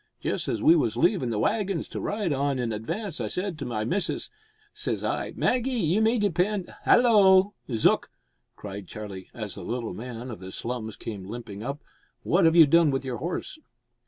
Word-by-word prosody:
Just - - -2
as 110 - -2
we 165 - +7
was 115 -8 +1
leavin' 170 - +2
the 110 - -1
waggins 195 - 0
to - - -5
ride 205 -7 -1
on 140 0 0
in 120 -3 -1
advance 165 - -4
I - - -1
said 180 -3 -3
to 140 - -4
my 110 -3 -2
missus 180 - -1 0.4
says - - -3
I - - -2
Maggie, 250 +1 +1
you 200 -3 +1
may 225 +2 +3
depend 200 -1 0
" - - -24
"Hallo! 205 -5 +6 0.2
Zook," 115 -2 +2 0.5
cried 100 -2 -8
Charlie, 100 -3 -8
as 105 -3 -5
the 100 - -8
little 115 +4 -3
man 120 +1 -7
of 110 - -8
the 95 0 -8
slums 115 0 -4
came 100 -4 -7
limping 110 -2 -7
up, 140 +5 -5 0.4
"what 175 +2 +3
have 165 0 +5
you 165 -2 +9
done 165 +2 +5
with 135 0 -1
your 125 -2 -3
horse?" 175 - -4
140 Hz, 190 wpm, -26 LUFS, 115-190 Hz, 0.5 s, you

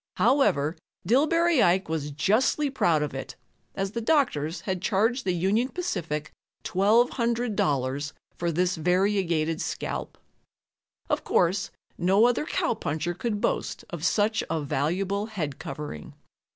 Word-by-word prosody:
However, 175 - +3 0.3
Dillbery 315 - +3
Ike 185 +2 +3
was 155 -2 -2
justly 220 - +1
proud 165 - +2
of 150 - -4
it, 135 - -6 0.4
as 195 0 -2
the 235 - -3
doctors 180 - +1
had 190 -2 -3
charged 225 +5 +1
the 185 - +2
Union 195 +8 +1
Pacific 170 - -3 0.3
$1,200 200 - +1 0.2
for 170 -1 -1
this 180 +2 0
variegated 175 -2 +1
scalp. - - -4 0.9
Of - - 0
course, 185 +3 +1 0.3
no 190 +6 +4
other 245 +5 +1
cowpuncher 170 -5 -1
could 210 +3 -2
boast - - -2
of 170 -3 -6
such 215 +4 +2
a 165 - 0
valuable 185 +9 -1
head 160 -11 -4
covering. 135 - -7
185 Hz, 125 wpm, -26 LUFS, 155-225 Hz, 0.9 s, no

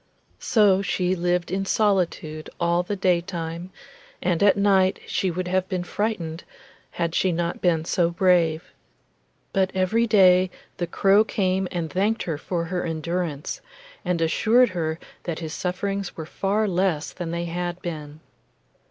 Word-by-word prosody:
So 200 -4 +4
she 185 -1 0
lived 175 -1 0
in 195 +1 0
solitude 180 -7 0
all 170 0 +2
the 190 +3 -3
daytime, 175 -2 -1 0.5
and 175 -3 0
at 200 0 +5
night 195 -2 +3
she 190 - -1
would 180 +1 -3
have 185 +1 0
been 185 -3 -2
frightened, 175 -5 -3 0.5
had 170 -1 -2
she 185 - +2
not 170 0 -2
been 165 -3 +2
so 170 0 +2
brave; 170 -2 +2 0.8
but 190 -2 +2
every 220 +5 +2
day 185 -3 +5 0.3
the 175 - -2
crow 195 +4 +4
came 190 -3 0
and 170 -2 -3
thanked 205 +7 0
her 160 -4 -3
for 170 0 -2
her 180 +1 -2
endurance, 165 -2 -3 0.4
and 175 -2 -1
assured 230 +9 +4
her 160 -3 -2 0.3
that 170 -3 -3
his 160 -2 -5
sufferings 195 +2 -3
were 160 - -5
far 200 +6 0
less 180 -4 0
than 175 -2 -5
they 170 +1 -2
had 175 +1 -3
been. 155 -3 -6
180 Hz, 150 wpm, -24 LUFS, 170-190 Hz, 0.8 s, at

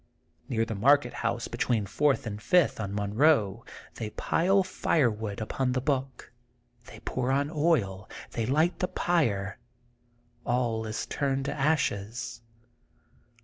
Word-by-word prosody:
Near 115 -1 +1
the 115 - -4
market 125 +4 +3
house 115 0 -2
between 115 -2 0
Fourth 145 +7 +1
and 105 -1 -5
Fifth 180 -3 +3
on 100 -3 -3
Monroe 105 +1 +2 0.3
they 110 - -5
pile 190 - +2
fire 160 -8 +1
wood 105 -1 -5
upon 125 +3 -1
the 130 - +1
book. 135 -2 -2 0.6
They - - -12
pour 130 0 -1
on 140 +2 +1
oil. 130 - +1 0.2
They 115 -2 -2
light 155 +7 +2
the 180 - +1
pyre. 115 - 0 0.8
All 120 -2 0
is 110 - -3
turned 135 -1 -1
to - - -2
ashes. 125 -5 -1
125 Hz, 135 wpm, -28 LUFS, 110-145 Hz, 0.8 s, market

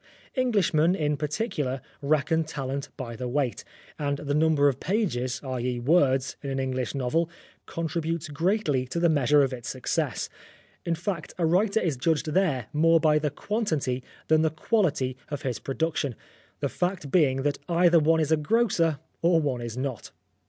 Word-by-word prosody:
Englishmen, 190 - +2
in 150 -4 0
particular, 150 - -2 0.2
reckon 155 +3 +2
talent 140 -2 -4
by 120 -4 -5
the 125 +2 -4
weight, 130 -1 -1 0.4
and 145 -1 -1
the 145 0 -3
number 150 -1 +4
of 135 - 0
pages, 160 - -1
i.e. 125 -2 -2
words, 135 -1 +2
in 140 - -5
an 135 - -2
English 130 -1 -2
novel 150 +6 0 0.4
contributes 165 0 -2
greatly 150 -4 0
to 170 - -3
the 170 0 +4
measure 145 -1 +4
of 135 -1 -1
its 120 -2 -6
success. 130 -2 -2 0.6
In 170 - +1
fact, 170 0 -4
a 170 - +1
writer 200 +6 +3
is 165 - -1
judged 155 +2 0
there 155 - +1
more 165 +2 +5
by 155 -1 +4
the 150 0 0
quantity 145 - -2 0.2
than 155 0 +4
the 160 - +3
quality 155 - 0
of 145 +1 -5
his 125 -6 -2
production, 140 +1 -2 0.5
the - - +1
fact 180 -6 -2
being 135 -6 +3
that 145 -1 0
either 170 0 +5
one 160 +1 +3
is 155 -1 0
a 160 - +5
grocer, 165 -2 +2 0.2
or 170 0 +4
one 135 -6 -1
is 120 0 -5
not. 130 -3 -4
150 Hz, 165 wpm, -26 LUFS, 135-165 Hz, 0.6 s, more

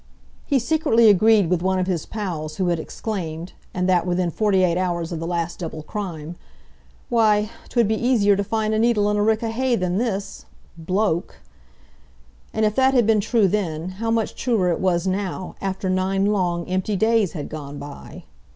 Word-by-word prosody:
He 280 - +3
secretly 235 -4 +3
agreed 210 0 +5
with 175 0 0
one 190 +1 +1
of 185 - 0
his 180 -4 -2
pals 165 -8 -4
who 185 -2 0
had 170 -1 0
exclaimed, 170 -3 -5 0.2
and 180 0 -1
that 180 -1 +2
within 180 -1 0
twenty 200 0 +2
four 175 -1 +2
hours 170 -2 -2
of 165 - -3
the 165 - -4
last 170 -1 -2
double 160 -3 -6
crime, 170 -3 -6 0.7
"Why, 215 -2 +3 0.2
'twould 235 -4 +2
be 220 +2 -1
easier 215 -5 +4
to 200 - -1
find 215 +1 -1
a 215 - +1
needle 215 -3 +2
in 210 - 0
a - - +2
rick 220 +1 +2
o' 225 - -1
hay 250 +2 +1
than 185 -1 -1
this—bloke!" 195 -4 -3 1.2
And 220 0 +1
if 210 - +1
that 265 +3 +3
had 240 -3 +4
been 215 -1 +3
true 220 0 +2
then, 175 -4 -2
how 230 - -1
much 225 -1 0
truer 220 -8 0
it 170 - -1
was 180 -2 +1
now—after 190 0 -3
nine 190 +1 +1
long, 180 -4 0
empty 185 +3 -1
days 220 -2 +2
had 150 -4 -5
gone 145 -2 -7
by? 145 0 -10
195 Hz, 185 wpm, -22 LUFS, 175-220 Hz, 1.2 s, agreed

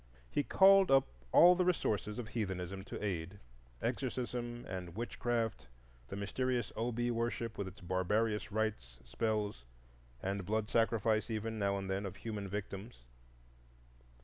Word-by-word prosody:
He - - +2
called 195 +4 +6
up 135 0 +6 0.3
all 175 +1 +9
the 180 0 +2
resources 110 - 0
of 120 -3 -5
heathenism 95 -4 -3
to - - -6
aid,—exorcism 100 - -4
and 90 -2 -5
witch 120 +2 -5
craft, 115 - -1 0.4
the - - -6
mysterious 120 +4 -1
Obi 120 +1 0
worship 115 -1 -2
with 100 - -3
its 95 +2 -10
barbarious 105 +5 0
rites, 105 - -2
spells, 105 - -1 0.6
and 95 +5 -2
blood 105 +3 -1
sacrifice 115 -1 +2
even, 110 0 -2
now 100 -1 +1
and 95 -1 -4
then, 95 +1 -1
of 95 - -7
human 105 -3 -5
victims. 100 - -6
105 Hz, 135 wpm, -35 LUFS, 95-120 Hz, 0.6 s, all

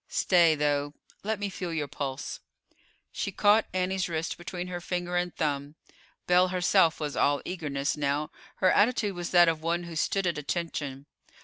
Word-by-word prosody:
Stay 170 -4 +4
though, 145 0 0 0.3
let 220 +1 -1
me 205 - -1
feel 180 -2 -5
your 155 -3 -2
pulse." 140 -2 -5 0.7
She - - -3
caught 210 +1 +4
Annie's 185 +1 -1
wrist 160 0 -2
between 175 +1 -6
her 180 -1 -5
finger 175 0 -3
and 175 0 -1
thumb. 145 -1 -2 0.5
Belle 180 +1 +4
herself 180 -2 +3
was 150 -2 -3
all 145 0 +2
eagerness 145 -6 -2
now; 145 +1 -1 0.2
her 185 -1 +3
attitude 210 -2 +2
was 175 -1 -4
that 175 -1 +6
of 160 -1 +1
one 170 +2 -1
who 170 -1 -8
stood 195 +4 0
at 170 -4 0
attention. 145 -3 -4
170 Hz, 170 wpm, -28 LUFS, 150-180 Hz, 0.7 s, that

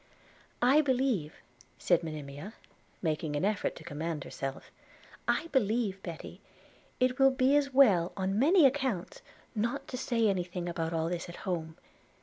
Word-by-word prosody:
'I 270 +5 +6
believe,' 255 - 0 0.4
said 175 -2 +2
Monimia, 155 +4 -7 0.5
making 155 -2 -1
an 145 - 0
effort 210 -1 0
to - - -11
command 155 0 -4
herself, 135 0 -6 0.6
'I - - +1
believe, 215 -5 +1
Betty, 170 -4 -8 0.6
it 255 0 +1
will 270 0 +7
be 260 +1 +3
as 285 -1 +2
well, 205 -11 +5
on 195 +2 0
many 320 +5 +6
accounts, 265 - 0 0.3
not 240 +5 -2
to 255 - -4
say 230 -4 +1
any 190 -3 +1
thing 175 0 -5
about 165 -1 -2
all 165 -1 0
this 175 0 -4
at 170 - -8
home. 165 -4 -3
195 Hz, 150 wpm, -30 LUFS, 165-260 Hz, 0.6 s, will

